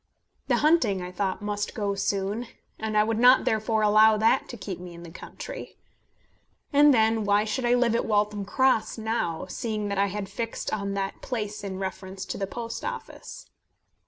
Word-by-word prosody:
The - - +3
hunting, 305 - +3
I 180 - -6
thought, 190 +2 -2
must 205 +2 -3 0.2
soon 200 +2 -1
go, 245 - -8 0.3
and 220 -1 -1
I 210 - +6
would 220 +1 -1
not 250 +2 +6
therefore 220 0 +1
allow 215 +1 +6
that 225 +5 +2
to 240 - -7
keep 190 -3 -6
me 175 -1 -9
in 170 - -11
the 170 - -10
country. - - -9 1.0
And 290 +1 +7
then, 220 -2 +3
why 205 0 +3
should 220 +4 -2
I 240 +1 +4
live 245 -2 +2
at 230 - 0
Waltham 210 -1 +1
Cross 250 +2 +1
now, 220 -7 -2
seeing 215 -3 -3
that 200 -1 -1
I 200 - +3
had 200 0 -4
fixed 230 +3 -4
on 200 -2 -2
that 195 0 -3
place 210 -4 -4
in 190 -2 -4
reference 190 0 -5
to - - -5
the 195 - -2
Post 230 +2 -6
Office? - - -7
210 Hz, 190 wpm, -26 LUFS, 200-230 Hz, 1.0 s, And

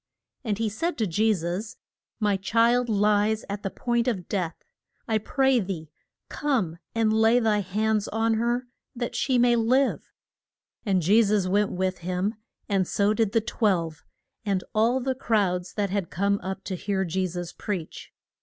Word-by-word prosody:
And 215 -5 -1
he 225 0 0
said 285 - -2
to 225 - +1
Je 215 +5 +2
sus, 185 +3 -3 0.4
My 210 -2 +2
child 230 +5 +2
lies 210 +1 +2
at 200 0 -4
the 195 - -2
point 235 +3 -1
of 195 -8 -1
death. 180 -5 -2 0.5
I 220 -2 +1
pray 265 +3 +2
thee 175 -7 -5 0.4
come 220 - -1 0.2
and 225 -1 +2
lay 225 +2 +4
thy 220 -3 +2
hands 210 +2 0
on 225 +1 +1
her 240 +3 0 0.3
that 240 0 -3
she 260 -2 +1
may 240 0 +4
live. 250 +4 +1 0.8
And 190 -3 +2
Je 205 +8 +5
sus 205 -3 +2
went 200 +2 +1
with 185 0 -1
him, 185 +4 -1 0.3
and 195 -3 +1
so 205 +1 +2
did 220 -2 +1
the 225 - +2
twelve, 175 - -1 0.4
and 195 -3 0
all 235 +4 +2
the 265 +1 0
crowd 200 -8 0
that 200 -3 -1
had 195 -4 -1
come 200 +2 0
up 190 +1 -5
to 190 - -4
hear 190 +1 -1
Je 185 +2 -1
sus 175 0 -5
preach. 185 -6 -5
210 Hz, 170 wpm, -26 LUFS, 190-230 Hz, 0.8 s, Je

